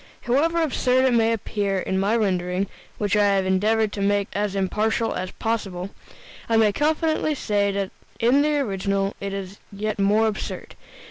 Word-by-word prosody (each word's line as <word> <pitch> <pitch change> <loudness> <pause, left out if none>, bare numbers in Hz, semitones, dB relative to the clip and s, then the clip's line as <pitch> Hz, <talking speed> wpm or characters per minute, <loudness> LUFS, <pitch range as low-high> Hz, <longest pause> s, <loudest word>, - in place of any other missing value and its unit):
However 325 +7 +2
absurd 260 -3 +2
it 260 - +3
may 230 -1 +3
appear 205 -3 -1
in 190 0 -1
my 200 +4 +2
rendering 185 -3 0 0.3
(which 205 -1 0
I 205 -1 +4
have 190 -1 +1
endeavored 210 +3 +1
to 200 - -4
make 200 0 +1
as 205 -1 -1
impartial 215 +4 0
as 185 - -3
possible), 195 -5 -3 0.6
I 225 - +3
may 220 -2 +4
confidently 310 - +1
say 205 -5 0
that 195 -1 -2 0.3
in 250 +5 +4
the 300 0 +2
original 195 -5 -1
it 200 0 -3
is 195 0 -6
yet 210 +1 -3
more 205 +3 +3
absurd. 215 -1 -4
205 Hz, 170 wpm, -23 LUFS, 195-230 Hz, 0.6 s, I